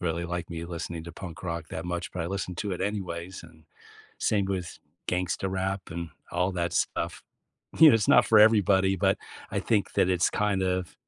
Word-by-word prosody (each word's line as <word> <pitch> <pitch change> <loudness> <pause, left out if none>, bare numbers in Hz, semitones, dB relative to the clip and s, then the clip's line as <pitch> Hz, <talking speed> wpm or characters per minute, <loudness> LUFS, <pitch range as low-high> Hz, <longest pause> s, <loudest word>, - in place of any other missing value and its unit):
really 85 0 -1
liked 90 +1 -4
me 85 0 -5
listening 85 -1 -5
to 85 - -8
punk 85 -2 -9
rock 85 -3 -4
that 80 - -5
much, 85 0 -4
but 90 - -4
I - - -3
listened 90 -1 -4
to 100 -2 -2
it 90 - -4
anyways, 95 -3 -4
and 80 -1 -17 0.5
same 100 -2 +1
with 95 -3 -4 0.3
gangsta 90 +1 -1
rap 95 +1 -2
and 85 0 -5 0.2
all 90 +2 0
that 85 -2 -2
stuff. 85 0 -1 0.6
You 160 - +10
know, 130 - +7
it's 110 -3 +1
not 120 - +6
for 110 - +6
everybody, 100 -3 +5
but - - +2 0.3
I - - -1
think 105 -3 0
that 90 - +3
it's 90 -1 +3
kind 105 -2 0
of 90 -2 -1
90 Hz, 200 wpm, -27 LUFS, 85-95 Hz, 0.6 s, You